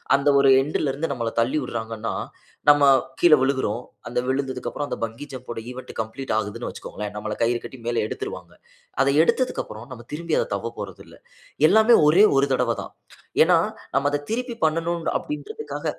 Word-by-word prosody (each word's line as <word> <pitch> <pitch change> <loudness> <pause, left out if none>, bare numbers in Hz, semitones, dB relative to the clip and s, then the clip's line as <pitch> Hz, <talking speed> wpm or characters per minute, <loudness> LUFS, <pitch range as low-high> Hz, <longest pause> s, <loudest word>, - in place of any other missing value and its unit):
அந்த 140 +1 -1
ஒரு 140 - +5
எண்ட்ல் 145 0 -1
இருந்து 145 +3 -3
நம்மள 115 -3 -3
தள்ளி 120 +6 0
விடுறாங்கன்னா 115 -2 -4 0.6
நம்ம 145 0 +6 0.4
கீழே 170 -3 +7
விழுகுறோம். 130 -4 0 0.3
அந்த 120 - -1
விழுந்ததுக்கு 130 -1 -2
அப்புறம் 145 - -4
அந்த - - -3
பங்கி 115 +6 -5
ஜம்ப் 130 -1 -9
ஓட - - -6
ஈவன்ட் 130 +1 -9
கம்ப்ளீட் 110 +4 -5
ஆகுதுன்னு 110 +2 -3
வச்சுக்கோங்களேன். 105 -1 -7
நம்மள 105 0 -4
கயிறு 120 +1 +1
கட்டி 130 - -9
மேல 115 -2 +1
எடுத்துருவாங்க. - - -6 0.5
அத - - 0 0.2
எடுத்ததுக்கு 255 +8 0
அப்புறம் 110 +3 -10
நாம 120 -2 -11
திரும்பி 165 +1 -1
அத - - 0
தவ்வ 110 +4 -4
போறதில்ல. 95 -3 -9 0.5
எல்லாமே 220 +2 +6
ஒரே 180 +8 +7
ஒரு 140 - +4
தடவ 125 -2 +1
தான். - - -11 0.5
ஏன்னா - - +4 0.4
நாம 140 +1 +2
அதை 145 - 0
திருப்பி 245 +1 -2
பண்ணனும் 165 +1 -1
அப்படின்றதுக்காக 435 +9 -6
130 Hz, 170 wpm, -23 LUFS, 115-155 Hz, 0.6 s, கீழே